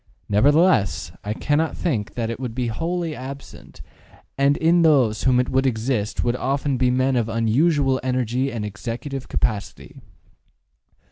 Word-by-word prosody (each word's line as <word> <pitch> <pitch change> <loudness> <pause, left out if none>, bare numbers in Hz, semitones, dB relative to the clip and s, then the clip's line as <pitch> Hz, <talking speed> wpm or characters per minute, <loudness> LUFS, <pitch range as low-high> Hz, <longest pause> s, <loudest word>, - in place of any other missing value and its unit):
Nevertheless, 105 - +3
I 105 +1 -3
cannot 150 +5 0
think 115 - -2
that 115 -1 -2
it 115 - -6
would 125 -4 -5
be 125 -2 -1
wholly 165 +6 -3
absent, 135 +2 -10 0.5
and 140 +1 +2 0.3
those 130 -9 +3
in - - 0
whom 125 -1 +4
it 125 - 0
would 130 +1 +2
exist 110 -3 -1
would 120 0 0
often 135 +1 -1
be 125 0 +2
men 130 +1 +1
of 115 -2 0
unusual 130 +5 +2
energy 125 +1 -1
and 110 -3 -4
executive 120 +6 -6
capacity. 105 -3 -3
130 Hz, 145 wpm, -22 LUFS, 115-140 Hz, 0.5 s, whom